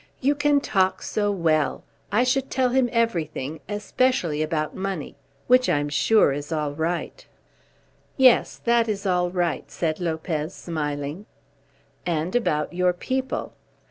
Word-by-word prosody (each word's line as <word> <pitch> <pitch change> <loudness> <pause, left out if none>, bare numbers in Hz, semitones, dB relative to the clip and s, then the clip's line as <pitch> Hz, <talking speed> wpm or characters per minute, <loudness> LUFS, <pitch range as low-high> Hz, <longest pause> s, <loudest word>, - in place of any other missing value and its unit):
"You 280 +2 +2
can 295 0 +3
talk 190 -7 +1
so 205 -1 0
well! 160 -5 +1 0.3
I 215 +5 +3
should 260 +1 +1
tell 255 -1 +1
him 250 0 +2
everything, 160 - -1
especially 205 -6 0
about 155 0 -1
money, 190 -5 -4 0.3
which 255 +1 +4
I'm 145 0 +1
sure 145 +2 +4
is 145 +3 -6
all 150 -2 -1
right." 165 +3 -3 0.9
"Yes, 260 -3 +4
that 235 -1 +3
is 200 -2 -3
all 180 -2 +2
right," 175 -2 -1
said 160 -2 -2
Lopez, 160 -1 -3
smiling. 150 +2 -4 0.8
"And 170 +2 -2
about 150 -10 0
your 180 0 +2
people." 260 +8 -3
180 Hz, 135 wpm, -24 LUFS, 155-235 Hz, 0.9 s, which